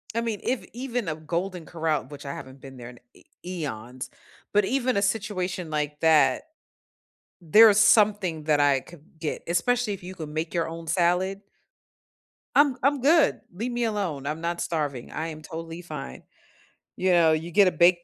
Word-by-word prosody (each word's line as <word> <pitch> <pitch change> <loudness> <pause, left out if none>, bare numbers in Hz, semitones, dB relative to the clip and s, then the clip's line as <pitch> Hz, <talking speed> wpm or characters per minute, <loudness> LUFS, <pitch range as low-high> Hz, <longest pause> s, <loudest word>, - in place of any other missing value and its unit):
I 230 - +1
mean, 225 -3 -3
if 255 -1 -1
even 245 -4 -3
a 155 - -1
Golden 170 +3 -4
Corral- 160 -3 -1
which 145 0 -10
I 140 - -4
haven't 130 0 -10
been 135 -1 -11
there 120 -1 -9
in 120 - -14
e - - -20 0.2
eons- 130 -8 -6 0.4
but 210 -1 +4
even 255 0 0
a - - +2
situation 195 -4 -2
like 150 -1 -2
that, 160 -2 +4 1.0
there 210 +7 +7
is 205 - +3
something 205 -6 +3
that 150 -1 +2
I 140 -2 +4
could 165 +2 -15 0.2
get, 160 -2 -4
especially 215 +6 +1
if 195 - -11
you 185 +1 -8
could 160 -4 -7
make 155 +2 -4
your 165 -1 0
own 165 0 -8
salad 180 +3 +1 1.2
I'm 285 -3 +5
I'm 275 0 +2
good, 315 +4 +4
leave 230 +7 -4
me 240 0 -1
alone, 195 -11 -2
I'm 155 +3 -3
not 170 0 -2
starving, 145 -7 -3
I 160 +1 -3
am 155 -1 -8
totally 165 +2 -7
fine. 150 - -8 0.7
You 185 0 +1
know, 170 -2 +5
you 160 +2 -1
get 200 +1 +5
a - - +3
baked 175 0 +4
170 Hz, 185 wpm, -26 LUFS, 155-205 Hz, 1.2 s, there